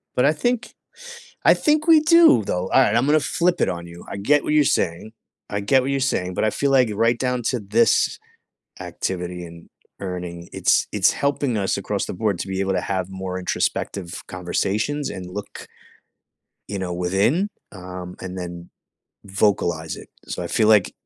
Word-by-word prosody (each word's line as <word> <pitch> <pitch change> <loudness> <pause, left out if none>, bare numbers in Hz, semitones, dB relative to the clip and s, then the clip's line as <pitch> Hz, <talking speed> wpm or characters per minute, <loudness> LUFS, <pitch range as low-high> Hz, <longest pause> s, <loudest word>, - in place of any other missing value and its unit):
But 125 - +3
I 150 - +4
think 245 +9 -1 0.7
I - - +7
think 305 +1 +1
we 325 -2 +8
do 325 - +6
though. 90 -1 -2
All - - +5
right, 105 - +3
I'm 120 +3 +3
gonna 150 +2 +4
flip 175 +4 0
it - - +3
on 85 -1 -5
you. 85 0 -12
I - - -5
get 145 +9 +2
what - - -1
you're 150 -1 +5
saying, 90 -4 -1 0.4
I 100 - -2
get 130 +6 +3
what 135 +2 -2
you're 140 - 0
saying, 95 -9 -1
but - - -1
I 110 - +3
feel 140 +6 0
like 130 -4 +4
right 115 +3 +2
down 125 0 -1
to 125 +2 0
this 110 +2 +2 0.6
activity 90 -1 -4
and 85 0 -13 0.3
earning, 90 -2 -6
it's - - +2
it's - - +3
helping 140 -4 -1
us 100 -2 0
across - - -2
the - - -5
board 100 -2 -1
to - - -4
be 95 0 -3
able 95 0 0
to - - 0
have 95 -2 -2
more 95 -1 -5
introspective 90 0 -2
conversations 105 +10 -2
and 90 -1 -7
look 100 +3 -8 1.0
you 100 0 -4
know, 90 -2 -3
within, 95 - +1 0.2
um, 90 -1 -8
and 95 0 -6
then 85 -1 -7 0.6
vocalize 95 -5 0
it. - - -12 0.2
So - - -4
I 85 - -4
feel 110 +3 +2
like 105 -4 +4
100 Hz, 190 wpm, -22 LUFS, 90-130 Hz, 1.0 s, we